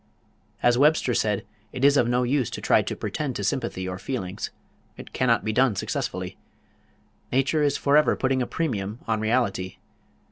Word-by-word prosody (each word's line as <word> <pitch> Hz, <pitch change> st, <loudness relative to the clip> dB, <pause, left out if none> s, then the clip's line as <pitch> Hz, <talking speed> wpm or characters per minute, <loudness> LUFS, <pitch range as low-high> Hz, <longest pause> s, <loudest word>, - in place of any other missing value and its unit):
As 120 Hz, 0 st, +4 dB
Webster 145 Hz, -3 st, +4 dB
said, 105 Hz, -3 st, 0 dB, 0.3 s
it 130 Hz, +1 st, 0 dB
is 140 Hz, 0 st, +6 dB
of 125 Hz, -4 st, +3 dB
no 125 Hz, +1 st, +2 dB
use 130 Hz, -1 st, +1 dB
to -, -, -6 dB
try -, -, +3 dB
to -, -, -4 dB
pretend -, -, -3 dB
to -, -, -3 dB
sympathy 95 Hz, 0 st, -2 dB
or 90 Hz, 0 st, -5 dB
feelings. 100 Hz, -9 st, -4 dB, 0.5 s
It -, -, -11 dB
cannot 120 Hz, -3 st, +2 dB
be 110 Hz, -, 0 dB
done 130 Hz, -2 st, +3 dB
successfully. -, -, -3 dB, 0.9 s
"Nature 135 Hz, +4 st, +2 dB
is 145 Hz, -1 st, +2 dB
forever 145 Hz, +2 st, +3 dB
putting 130 Hz, 0 st, 0 dB
a 125 Hz, -, -1 dB
premium 110 Hz, -10 st, -2 dB
on 110 Hz, -1 st, +1 dB
reality." 105 Hz, -5 st, 0 dB
125 Hz, 170 wpm, -25 LUFS, 105-135 Hz, 0.9 s, is